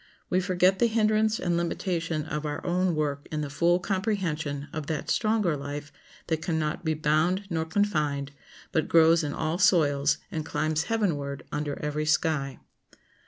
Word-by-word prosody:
We 185 - +3
forget 185 0 +2
the 235 - +4
hindrance 220 -1 +2
and 175 -1 0
limitation 170 -2 -1
of 150 -1 -4
our 150 -1 -4
own 180 -1 +1
work 145 -2 -2
in 155 -1 -2
the 145 -2 -4
full 170 +4 +3
comprehension 175 -8 -2
of 155 -2 -4
that 155 -3 -2
stronger 215 -7 +2
life 145 +1 -6 0.3
that 160 -1 -1
can 165 -2 -1
not 155 +2 -2
be 160 -1 0
bound 155 +6 +1
nor 160 -1 0
confined, 150 -7 0 0.4
but 160 - +1
grows 165 0 +5
in 145 - -2
all 160 +3 -2
soils, 145 -7 +3
and 155 - -3
climbs 155 +2 -1
heavenward 150 -11 -1
under 145 -1 -2
every 150 +1 -2
sky. 150 -4 +1
160 Hz, 165 wpm, -27 LUFS, 150-180 Hz, 0.4 s, grows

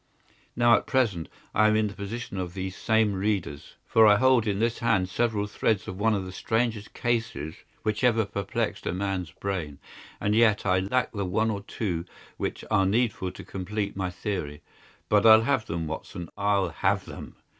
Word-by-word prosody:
Now, 120 0 +5
at - - -1
present 110 - +1 0.2
I 110 +1 +4
am 110 - +3
in 110 0 +3
the 105 - -4
position 100 0 -5
of 90 0 -5
these 95 0 -4
same 110 -2 +2
readers, 95 -7 -2
for 110 -1 +5
I 105 - +7
hold 125 0 +4
in 100 -2 0
this 115 +2 0
hand 110 -6 +1
several 105 +1 0
threads 105 0 0
of 95 - -6
one 110 +1 +3
of 95 -2 -2
the 95 - -7
strangest 110 +2 -2
cases 110 -11 -1 0.3
which 110 +2 -1
ever 115 -3 +3
perplexed 100 +2 -3
a - - 0
man's 95 -2 -2
brain, 85 -5 -4 0.4
and 105 - 0
yet 110 -3 +4
I 95 -1 +3
lack 110 +7 0
the 100 -2 -3
one 110 +5 +1
or 100 -2 -4
two 90 -5 -3 0.3
which - - -4
are 95 -1 +3
needful 105 -3 0
to - - -10
complete 100 +2 -4
my 95 -1 -2
theory. 90 -6 -4 0.4
But 105 +1 +4
I'll 110 0 +8
have 115 -3 0
them, 85 -1 -3
Watson, 80 +2 -6
I'll 100 -2 +1
have 80 - 0
them!" - - -9
100 Hz, 190 wpm, -27 LUFS, 95-110 Hz, 0.4 s, I'll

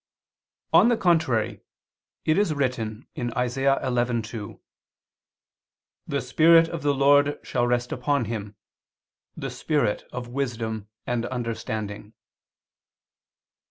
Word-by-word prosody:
On - - +7
the 240 - +2
contrary, 160 - +1 0.6
It 155 - +3
is 175 -7 +1
written 125 -5 -2
(Isa. 125 +3 0
11:2): 120 -4 -2 1.5
"The - - -1
Spirit 165 +1 +5
of 165 -2 -5
the 145 -1 +1
Lord 145 +1 +4
shall 120 -1 0
rest 120 0 0
upon 130 0 0
him, 105 -2 -5 0.8
the - - -4
Spirit 145 -9 0
of 125 -1 -5
wisdom 115 -5 -3 0.2
of 120 -1 -1
understanding." 110 -4 -4
125 Hz, 100 wpm, -25 LUFS, 115-145 Hz, 1.5 s, On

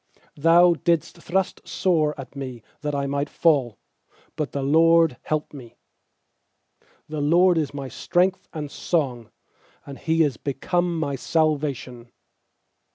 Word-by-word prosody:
13Thou 170 +2 +4
didst 170 -2 0
thrust 190 +2 -1
sore 155 -5 0
at 135 +1 -9
me 130 -4 -7 0.2
that 150 -1 -2
I 140 0 -1
might 140 +1 -2
fall; 135 - +1 0.6
But 150 -2 -3
the 140 - -3
LORD 165 -1 +4
helped 155 -1 -3
me. 125 -5 -12 1.3
14The 150 -1 -2
LORD 175 0 +5
is 150 -3 -2
my 140 -1 -6
strength 180 +7 0
and 150 -2 -6
song; 130 -9 -2 0.6
And 140 -1 -9
He 165 0 +2
is 140 -7 -1
become 175 +4 -1
my 140 -3 -2
salvation. 140 -5 -1
150 Hz, 130 wpm, -23 LUFS, 140-165 Hz, 1.3 s, LORD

